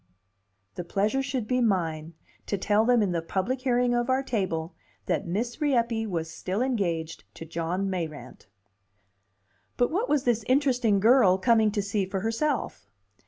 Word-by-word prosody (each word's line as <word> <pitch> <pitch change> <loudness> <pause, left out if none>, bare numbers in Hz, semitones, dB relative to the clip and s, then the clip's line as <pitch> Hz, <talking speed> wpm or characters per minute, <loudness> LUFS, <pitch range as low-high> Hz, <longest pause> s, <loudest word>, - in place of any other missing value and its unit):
The 180 - -5
pleasure 205 +9 0
should 260 -5 -3
be 250 +1 +1
mine 165 -7 -1 0.3
to 200 - -1
tell 210 +3 +2
them 240 -2 +4
in 195 - 0
the 170 -1 -1
public 195 +10 -2
hearing 245 -1 +1
of 240 +1 0
our 260 +1 +2
table 185 -9 -2 0.3
that - - -1
Miss 235 - -3
Rieppe 235 -6 +1
was 165 -5 -3
still 185 +7 -2
engaged 170 -11 -2
to 165 - -8
John 170 +4 -2
Mayrant. 155 - -6 1.3
But 245 - +2
what 410 +9 -1
was 295 -3 +2
this 235 -3 +1
interesting 255 -6 +2
girl 215 -3 +5
coming 220 +2 +3
to 205 - -1
see 200 -1 -1
for 190 0 -3
herself? 225 - -2
210 Hz, 160 wpm, -27 LUFS, 180-245 Hz, 1.3 s, girl